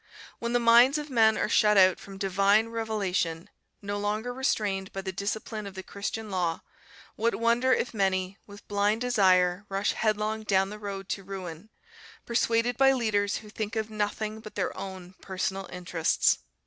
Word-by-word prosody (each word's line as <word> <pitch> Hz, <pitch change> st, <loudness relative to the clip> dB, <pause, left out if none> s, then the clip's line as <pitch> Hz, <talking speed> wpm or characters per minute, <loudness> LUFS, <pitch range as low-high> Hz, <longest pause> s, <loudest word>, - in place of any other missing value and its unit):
When 235 Hz, 0 st, -3 dB
the 245 Hz, -, +3 dB
minds 240 Hz, +4 st, +6 dB
of 300 Hz, -1 st, -6 dB
men 220 Hz, -3 st, +4 dB
are -, -, 0 dB
shut 210 Hz, -1 st, +4 dB
out 185 Hz, -1 st, +6 dB
from 195 Hz, -1 st, -11 dB
divine 200 Hz, +3 st, +2 dB
revelation, 200 Hz, -6 st, -2 dB, 0.3 s
no 205 Hz, 0 st, -3 dB
longer 215 Hz, +4 st, -2 dB
restrained 205 Hz, -7 st, -1 dB
by 195 Hz, -, -5 dB
the 190 Hz, 0 st, -4 dB
discipline 205 Hz, +2 st, -4 dB
of 195 Hz, -, -10 dB
the 190 Hz, -, -6 dB
Christian 210 Hz, +2 st, -5 dB
law, 175 Hz, -3 st, -1 dB, 0.5 s
what 230 Hz, +2 st, 0 dB
wonder 235 Hz, +3 st, +2 dB
if 245 Hz, -, +1 dB
many, 190 Hz, -1 st, 0 dB
with 205 Hz, 0 st, -13 dB
blind 205 Hz, +2 st, +1 dB
desire, 185 Hz, -6 st, +3 dB
rush 195 Hz, +1 st, 0 dB
headlong 215 Hz, 0 st, -1 dB
down 195 Hz, -2 st, +1 dB
the 210 Hz, -, -8 dB
road 195 Hz, -2 st, -6 dB
to 195 Hz, -, -3 dB
ruin, 185 Hz, 0 st, -8 dB, 0.6 s
persuaded 235 Hz, 0 st, +1 dB
by 270 Hz, 0 st, +5 dB
leaders 205 Hz, -5 st, 0 dB
who -, -, -12 dB
think 215 Hz, 0 st, -4 dB
of 220 Hz, 0 st, -2 dB
nothing 215 Hz, +1 st, -2 dB
but 215 Hz, -1 st, -11 dB
their -, -, -2 dB
own 185 Hz, -2 st, -8 dB
personal 190 Hz, 0 st, -3 dB
interests. 175 Hz, -2 st, +1 dB
205 Hz, 170 wpm, -28 LUFS, 195-225 Hz, 0.6 s, minds